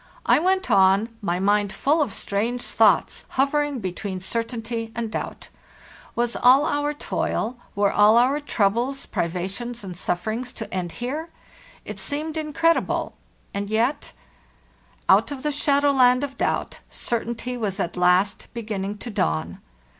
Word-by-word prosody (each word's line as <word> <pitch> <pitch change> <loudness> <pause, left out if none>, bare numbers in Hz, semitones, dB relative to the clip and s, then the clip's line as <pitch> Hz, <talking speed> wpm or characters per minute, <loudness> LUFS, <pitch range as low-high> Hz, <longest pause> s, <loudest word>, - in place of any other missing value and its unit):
I - - +5
went 375 +3 +1
on, 195 +3 +5
my 180 -3 -1
mind 205 +1 +2
full 300 +9 +1
of 280 - 0
strange 230 +7 -2
thoughts, 210 -5 +2
hovering 290 +1 +2
between 190 -2 -4
certainty 230 +2 -3
and 230 -2 -3
doubt. - - -5 0.7
Was 240 0 0
all 260 +4 +6
our 290 0 0
toil, 245 -4 -2 0.2
were 200 0 +2
all 210 +2 +5
our 260 +5 +4
troubles, 245 0 0
privations, 195 +8 -3
and 185 -2 -7
sufferings 220 +9 -3
to 220 - -7
end 180 -2 -3
here? 290 +7 -4 0.6
It - - -6
seemed 305 +2 -3
incredible, 320 +2 +1 0.4
and 200 0 -3
yet— 240 +7 0 1.0
Out - - +5
of 280 -3 -6
the 300 - 0
shadow 285 0 +2
land 255 -1 +4
of 275 -1 -4
doubt, - - -1
certainty 235 +1 -3
was 210 -4 -3
at 175 -3 -2
last 180 +2 +2
beginning 210 -3 -3
to 235 +3 -7
dawn. 80 - -1
235 Hz, 140 wpm, -24 LUFS, 200-275 Hz, 1.0 s, all